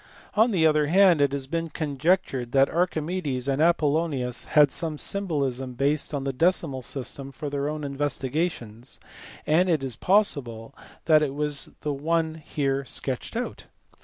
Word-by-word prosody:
On 220 +3 +4
the 180 -7 +2
other 150 -1 +3
hand 180 -2 +5
it 140 -1 +3
has 140 -1 -3
been 165 +3 -3
conjectured 145 -4 -1
that 135 0 +4
Archimedes 160 -5 -1
and 140 +1 +1
Apollonius 150 -6 +1
had 150 -3 +5
some 160 0 -4
symbolism 140 -10 -2
based 140 +3 0
on 140 -2 -3
the 135 0 -2
decimal 160 -3 +1
system 135 +2 -6
for 145 +1 -6
their 140 0 -1
own 155 0 -4
investigations, 140 -3 -3 0.5
and 175 +4 +3
it 155 -5 +1
is 130 -4 -4
possible 140 - 0 0.3
that 155 -1 +5
it 140 -2 -1
was 150 -1 -2
the 150 -1 -2
one 160 +3 0
here 140 -2 -1
sketched 130 - -5
out. 245 - -5
145 Hz, 155 wpm, -25 LUFS, 135-165 Hz, 0.5 s, hand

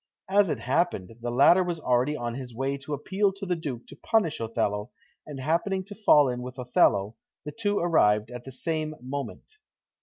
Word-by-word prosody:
As 200 -1 +4
it - - -2
happened, 130 - 0
the 120 - -3
latter 140 +9 +5
was 175 -2 -3
already 130 +2 +1
on 120 -1 -3
his 125 -2 -8
way 135 +3 -1
to 140 +2 -5
appeal 195 +7 0
to 195 +1 -7
the 180 -1 0
Duke 140 -8 -6
to - - -13
punish 165 -1 0
Othello, 105 -1 -2 0.4
and 145 -3 -7
happening 170 +7 0
to 205 +2 -10
fall 150 -9 +5
in 125 -1 -3
with 125 +1 -8
Othello, 115 -4 +2 0.3
the 150 - -5
two 205 0 -1
arrived 110 -10 +2
at 125 -1 -8
the 135 - -9
same 155 +3 -3
moment. 140 - -7
140 Hz, 190 wpm, -27 LUFS, 125-175 Hz, 0.4 s, latter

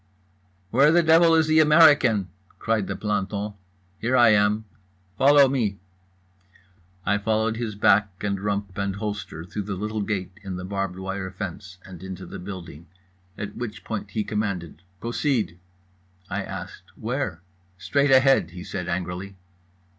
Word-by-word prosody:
"Where 140 +6 +5
the 170 +1 +4
devil 165 +1 +6
is 160 0 +4
the 155 0 +4
American?" 150 - +5 0.3
cried 110 -4 0
the - - -3
planton. 105 0 -2 0.5
"Here 125 +3 +1
I 120 -2 +7
am." 105 +1 +3 0.5
"Follow 140 +4 +6
me." 115 -7 -1 1.3
I 100 0 +2
followed 110 +1 0
his 115 -3 -4
back 105 0 +4
and 100 -1 -1
rump 100 -2 -2
and 100 -1 -1
holster 105 -6 -5
through 100 +4 -5
the 100 0 -4
little 105 +2 -3
gate 100 -3 -2
in 95 -2 -6
the 90 0 -6
barbed 95 -1 -3
wire 95 0 -4
fence 95 -1 -7
and 90 -3 -11
into 95 0 -7
the - - -8
building, 85 -4 -9 0.5
at 105 -1 -6
which 115 -2 -6
point 110 -2 -5
he 110 - -2
commanded 100 -7 -3 0.2
"Proceed." 115 - -1 0.7
I - - -1
asked - - -8
"Where?" 80 +1 -3 0.4
"Straight 140 +11 +1
ahead" 135 -3 +5
he 90 +1 -9
said 90 -2 -5
angrily. 90 +2 -4
105 Hz, 145 wpm, -24 LUFS, 95-115 Hz, 1.3 s, I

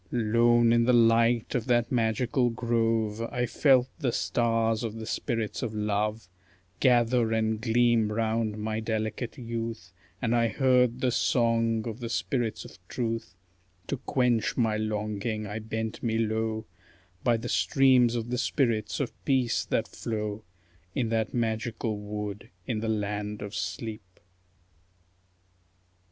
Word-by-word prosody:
Lone 120 0 +4
in 115 0 +4
the 125 - +4
light 115 0 +4
of 120 -1 -1
that 120 -1 +2
magical 120 +1 +1
grove, 115 -2 0
I 125 +1 -1
felt 130 -1 +3
the 130 -6 0
stars 115 -1 +1
of 110 -2 -3
the 110 -1 -6
spirits 115 -1 -2
of 110 -3 -3
Love 105 0 -1 0.5
Gather 120 -2 +3
and 110 -1 0
gleam 115 -2 +3
round 110 -1 0
my 110 +1 -2
delicate 110 +3 -3
youth, 115 -6 -5 0.3
And 115 +3 +1
I 115 -1 +3
heard 125 -1 +2
the 125 - +2
song 115 -2 +1
of 115 +1 -5
the 120 -2 -5
spirits 115 0 -2
of - - -13
Truth; 115 -6 -3 0.5
To 140 - -1
quench 125 -3 0
my 115 -3 +2
longing 110 0 -2
I 105 +2 -4
bent 110 0 -4
me 110 -2 0
low 110 0 -1 0.6
By 120 -2 +3
the 115 +2 -6
streams 130 -2 +4
of 120 0 -3
the 125 - 0
spirits 115 -5 0
of 140 - -2
Peace 130 -4 +1
that - - 0
flow 105 -1 -4 0.5
In 120 -4 0
that 110 -1 0
magical 115 -1 -1
wood 105 0 -6 0.2
in 110 -3 -2
the 110 +1 -2
land 105 -1 -2
of 100 0 -7
sleep. 105 -6 -5
115 Hz, 140 wpm, -28 LUFS, 110-120 Hz, 0.6 s, Lone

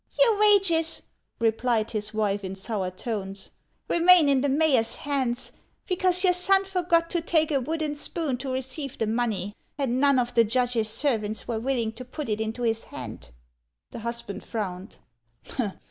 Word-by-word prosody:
" - - -18
Your 460 -4 +5
wages," 390 -6 +4 0.3
replied 225 0 +1
his 210 -1 -3
wife 205 -2 -1
in 190 0 -5
sour 195 -1 -3
tones, 195 0 -5 0.4
"remain 345 -2 +6
in 270 -2 +3
the 285 - +1
mayor's 270 -5 +2
hands, 260 -4 -2 0.3
because 365 -1 +1
your 365 -1 +5
son 385 +2 +2
forgot 345 -3 +1
to 345 - 0
take 320 -1 +2
a 275 -2 +2
wooden 310 +2 -2
spoon 295 -2 -2
to 265 +1 -5
receive 265 +2 -4
the 225 - 0
money, 215 -3 -1 0.2
and 260 -3 0
none 280 -1 +4
of 245 -1 0
the 230 - +5
judge's 235 -1 +1
servants 220 -4 0
were 230 -2 -2
willing 235 -2 -1
to 230 +3 -9
put 265 +2 -6
it 215 0 -1
into 220 +2 -3
his 225 -1 0
hand." - - -9 0.6
The - - -7
husband 235 -3 -6
frowned. 190 -4 -5
250 Hz, 165 wpm, -26 LUFS, 220-315 Hz, 0.6 s, remain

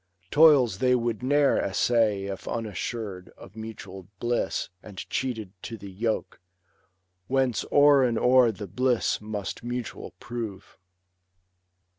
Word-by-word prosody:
Toils 140 -10 +5
they 125 -1 +3
would 120 -2 -1
ne'er 140 +2 +3
essay 105 0 +1
if 100 -1 -6
unassur'd 105 - -4
Of 95 - -14
mutual 100 -5 -9
bliss, 120 0 -1
and 100 -3 -13
cheated 115 -7 -2
to 115 - -7
the 100 -1 -10
yoke. 110 +1 -3 0.9
Whence 130 -3 +1
o'er 145 -1 +6
and 120 -3 +1
o'er 125 -1 +5
the 105 0 -7
bliss 120 +6 0
must 105 -1 -5
mutual 120 -1 -5
prove. 110 -5 -7
115 Hz, 120 wpm, -26 LUFS, 100-125 Hz, 0.9 s, o'er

